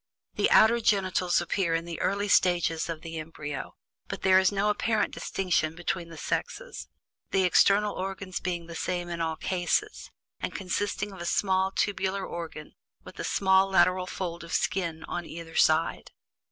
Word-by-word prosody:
The - - +2
outer 230 +2 +6
genitals 185 -4 +2
appear 175 -1 0
in 165 0 -2
the 170 -1 -6
early 200 +2 0
stages 175 -4 +2
of 160 -2 -4
the 165 -1 -5
embryo, 150 -3 -6 0.3
but - - -6
there 190 0 +6
is 190 0 +3
no 205 +1 +1
apparent 220 0 0
distinction 165 -4 -1
between 175 0 -3
the 165 - -10
sexes, - - -4 0.4
the 190 - +2
external 200 +3 +4
organs 190 0 -4
being 175 -2 -3
the 170 - -9
same 175 +1 -3
in 170 -1 -4
all 160 -1 -1
cases, 185 - -1 0.3
and - - -4
consisting 205 +2 -2
of 190 - -10
a - - -4
small 190 0 +1
tubular 195 -1 -1
organ 165 -3 -7 0.3
with 185 - -13
a - - -2
small 190 0 +3
lateral 185 -1 +3
fold 170 -3 -5
of 170 - -8
skin 170 -4 -1
on 175 -2 -5
either 165 0 -9
side. 160 +1 +2
180 Hz, 165 wpm, -28 LUFS, 170-195 Hz, 0.4 s, outer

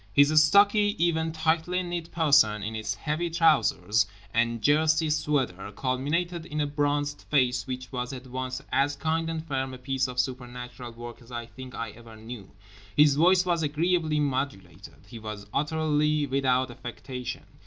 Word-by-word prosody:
His 145 +6 +6
stocky 205 +5 +4
even 160 -1 +1
tightly 160 +3 0
knit 175 -1 -5
person, 140 -11 +4
in 110 +2 -4
its 110 -1 -3
heavy 160 +3 -2
trousers 115 - +3 0.3
and 115 0 +1
jersey 155 +5 +3
sweater, 130 -11 -1
culminated 150 - -1
in 150 - -4
a 150 - +2
bronzed 145 0 -1
face 125 -4 +2
which 130 -1 -6
was 125 -1 -3
at 130 -1 -8
once 130 +1 -5
as 145 +1 +2
kind 160 +1 -1
and 165 0 -4
firm 135 -2 -2
a - - -9
piece 130 0 -1
of 125 0 -5
supernatural 125 -1 -4
work 120 +1 -9
as 120 +1 -16
I 120 -1 -4
think 130 +2 -11
I 115 -2 -4
ever 115 0 -14
knew. 110 -2 -9 0.5
His 150 -1 +7
voice 180 +5 +4
was 170 -2 +1
agreeably 155 +1 +1
modulated. 135 -6 -4
He 115 - -10
was 110 -2 -7
utterly 150 0 +1
without 130 -1 +1
affectation. 125 +1 -7
140 Hz, 160 wpm, -27 LUFS, 125-160 Hz, 0.5 s, His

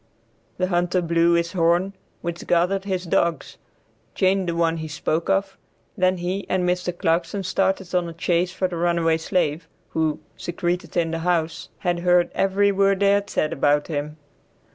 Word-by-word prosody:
The 185 - +1
hunter 180 0 +1
blew 170 0 +2
his 170 0 +1
horn 175 +2 +2 0.3
which 170 -1 -5
gathered 180 +3 +2
his 185 -2 -2
dogs, 170 -3 0 0.6
chained 190 -1 +2
the 170 - -2
one 165 -1 +1
he 160 0 -5
spoke 160 +2 -2
of, 195 0 0 0.4
then 185 -2 +2
he 180 +3 -3
and 185 -1 +1
Mr. 180 0 -1
Clarkson 170 +4 0
started 190 0 0
on 175 -2 +1
a - - -8
chase 175 +1 0
for 185 0 -1
the 175 -2 -5
runaway 170 -1 +2
slave, 165 -1 -1 0.2
who, 160 -2 -1 0.2
secreted 175 +1 -3
in 165 -1 +1
the 165 - -2
house, 165 -1 -1
had 175 -3 0
heard 175 0 +3
every 200 +1 +2
word 195 0 +2
they 200 0 +5
had 200 0 +1
said 155 - 0
about 145 +2 +1
him. 150 0 -4
175 Hz, 170 wpm, -23 LUFS, 165-185 Hz, 0.6 s, they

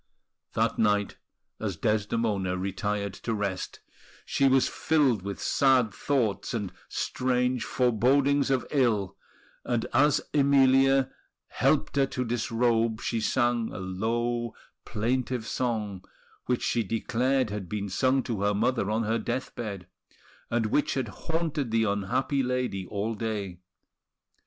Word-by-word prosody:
That - - 0
night, 105 -2 +2 0.4
as - - -3
Desdemona 105 -3 0
retired 100 +1 -2
to 110 +4 -3
rest, 100 -3 -3 0.4
she 140 - +2
was 135 0 +4
filled 140 -10 +2
with 100 +1 -5
sad 130 -6 +3
thoughts 120 -7 -1
and 105 -5 -3 0.2
strange 125 -1 0
forebodings 135 +4 +2
of 130 -2 +1
ill; 115 -9 +1 0.5
and 120 -2 -1
as 145 +3 +4
Emilia 135 -1 +4 0.4
helped - - +1
her 135 -1 +4
to 125 -1 -3
disrobe, 115 -1 +1
she 115 -2 -2
sang 120 0 +1
a - - -7
low, 115 +5 -2 0.3
plaintive 120 +1 -1
song, 110 -7 -2 0.4
which 125 -1 0
she 120 - +1
declared 120 +3 0
had 100 -4 -5
been 100 0 -3
sung 130 +7 +2
to 110 -5 -3
her 105 0 +2
mother 115 -1 +1
on 110 +2 +1
her 115 +2 0
death 125 +3 -3
bed, 100 -6 -5 0.6
and 115 -1 +1
which 125 +7 +1
had 130 -5 -1
haunted 160 -2 -2
the 115 0 +2
unhappy 110 +7 0
lady 125 -7 -2
all 105 +4 -2
day. 105 -5 -4
115 Hz, 130 wpm, -27 LUFS, 105-130 Hz, 0.6 s, was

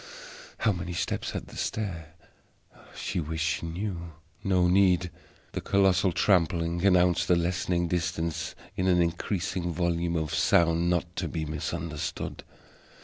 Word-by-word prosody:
How 110 - +2
many 90 -2 -4
steps 85 - -2
had - - -4
the - - -13
stair? 85 -7 -3 0.8
She - - -3
wished 80 0 -2
she 85 - -5
knew. 85 -1 -4 0.3
No 90 -2 +3
need! 90 -1 +3 0.4
The - - -4
colossal 95 -1 +3
trampling 85 -2 +2
announced 90 -2 +4
the 90 - +5
lessening 85 0 0
distance 85 -2 -2 0.2
in 95 - 0
an 90 -1 +4
increasing 90 +1 -1
volume 85 0 0
of 80 -2 -1
sound 85 0 +3
not 90 0 -1
to 85 - -1
be 80 -1 -3
misunderstood. 80 0 -4
85 Hz, 135 wpm, -28 LUFS, 85-90 Hz, 0.8 s, the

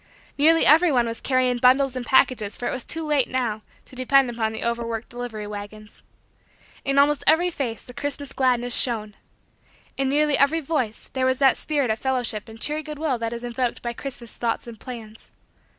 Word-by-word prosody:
Nearly 325 +3 +4
everyone 305 -6 +5
was 230 0 -5
carrying 255 -2 +1
bundles 260 +1 +4
and 255 - -3
packages 235 -4 +2
for 245 - -3
it - - -1
was 255 - -3
too 325 0 -4
late, 295 -4 +1
now, 240 -4 -1 0.2
to - - -15
depend 255 0 +3
upon 225 -2 -1
the 220 - -5
overworked 235 -1 -3
delivery 240 -3 -6
wagons. 210 +1 -9 0.8
In 275 0 0
almost 285 +1 +4
every 345 +3 +4
face, 245 -8 -4
the 245 - -12
Christmas 285 +1 -4
gladness 245 -2 +1
shone. 215 -4 +1 0.8
In 270 -1 0
nearly 295 0 +2
every 280 +4 +3
voice, 270 -8 -3
there 260 -1 +1
was 260 0 +1
that 270 -1 +4
spirit 285 -6 -1
of 220 - -2
fellowship 245 -5 -1
and 220 0 -12
cheery 300 +5 -1
good 305 -1 -8
will 285 -5 -1
that 230 0 -2
is 235 0 -6
invoked 245 0 -2
by 235 0 -3
Christmas 240 -2 -8
thoughts 230 -1 -2
and 230 -3 -10
plans. 225 -4 -10
250 Hz, 190 wpm, -24 LUFS, 230-280 Hz, 0.8 s, everyone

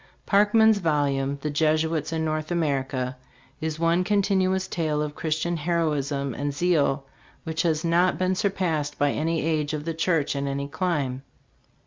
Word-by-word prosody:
Park 205 +1 +3
man's 220 -2 +6
volume, 140 -4 0
"The 150 - -2
Jesuits 155 +1 +1
in 160 -1 -1
North 155 0 -2
America," 135 -6 -1 0.4
is 155 0 -3
one 170 +2 +2
continuous 190 -1 +1
tale 155 -3 -1
of 150 -1 -2
Christian 160 +2 -1
heroism 145 -4 -1
and 145 +4 -2
zeal, 150 -5 +1 0.4
which 160 0 -2
has 160 -2 0
not 175 +2 +3
been 185 0 +1
surpassed 170 -7 -1
by 145 0 +2
any 160 0 -1
age 155 -2 0
of 150 0 -6
the 165 - -2
church 160 -3 0
in 140 0 -2
any 140 0 -2
clime. 145 -5 -1
155 Hz, 155 wpm, -25 LUFS, 145-170 Hz, 0.4 s, man's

